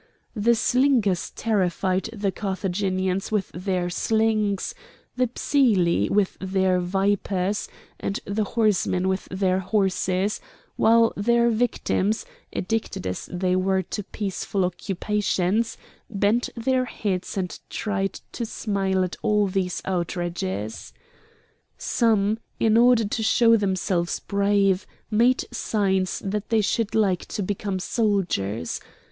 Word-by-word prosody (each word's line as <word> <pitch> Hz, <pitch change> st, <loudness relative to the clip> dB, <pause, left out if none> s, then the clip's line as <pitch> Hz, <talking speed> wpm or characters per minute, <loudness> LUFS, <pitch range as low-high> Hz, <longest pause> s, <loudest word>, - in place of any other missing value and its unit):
The 235 Hz, +2 st, +3 dB
slingers 240 Hz, -7 st, +2 dB
terrified 190 Hz, -2 st, 0 dB
the 205 Hz, -3 st, -1 dB
Carthaginians 190 Hz, -1 st, -2 dB
with 210 Hz, -3 st, 0 dB
their 180 Hz, -1 st, -1 dB
slings, 215 Hz, 0 st, +1 dB, 0.4 s
the 255 Hz, 0 st, +2 dB
Psylli 210 Hz, -, +2 dB
with 200 Hz, -2 st, +1 dB
their 190 Hz, -1 st, +1 dB
vipers, 195 Hz, +1 st, 0 dB, 0.3 s
and 195 Hz, -, -2 dB
the 210 Hz, +2 st, -1 dB
horsemen 195 Hz, -4 st, +1 dB
with 190 Hz, 0 st, -1 dB
their 185 Hz, 0 st, 0 dB
horses, 190 Hz, 0 st, 0 dB, 0.3 s
while 230 Hz, 0 st, +4 dB
their 235 Hz, +3 st, +3 dB
victims, 220 Hz, -2 st, 0 dB, 0.3 s
addicted 225 Hz, -, -2 dB
as 90 Hz, 0 st, -4 dB
they 180 Hz, 0 st, 0 dB
were 190 Hz, 0 st, +1 dB
to 210 Hz, -, -4 dB
peaceful 195 Hz, -1 st, -2 dB
occupations, 195 Hz, +3 st, -1 dB, 0.3 s
bent 210 Hz, +3 st, +1 dB
their 255 Hz, +2 st, +1 dB
heads 200 Hz, -5 st, -3 dB
and 180 Hz, -2 st, -3 dB
tried 195 Hz, -2 st, -2 dB
to 240 Hz, -, -4 dB
smile 195 Hz, -4 st, 0 dB
at 180 Hz, -, -4 dB
all 210 Hz, -2 st, +2 dB
these 185 Hz, -1 st, -2 dB
outrages. 170 Hz, -, -3 dB, 0.8 s
Some, 220 Hz, -2 st, +1 dB, 0.2 s
in 220 Hz, -1 st, +3 dB
order 240 Hz, -1 st, +5 dB
to 220 Hz, +2 st, -2 dB
show 230 Hz, +1 st, +5 dB
themselves 185 Hz, -4 st, 0 dB
brave, 200 Hz, -1 st, +1 dB, 0.2 s
made 240 Hz, +4 st, +3 dB
signs 190 Hz, -4 st, 0 dB
that 205 Hz, +1 st, -3 dB
they 225 Hz, -2 st, +3 dB
should 210 Hz, +1 st, 0 dB
like 195 Hz, -5 st, +1 dB
to 205 Hz, -, -3 dB
become 200 Hz, 0 st, -2 dB
soldiers. 180 Hz, -, -1 dB
200 Hz, 115 wpm, -24 LUFS, 185-220 Hz, 0.8 s, order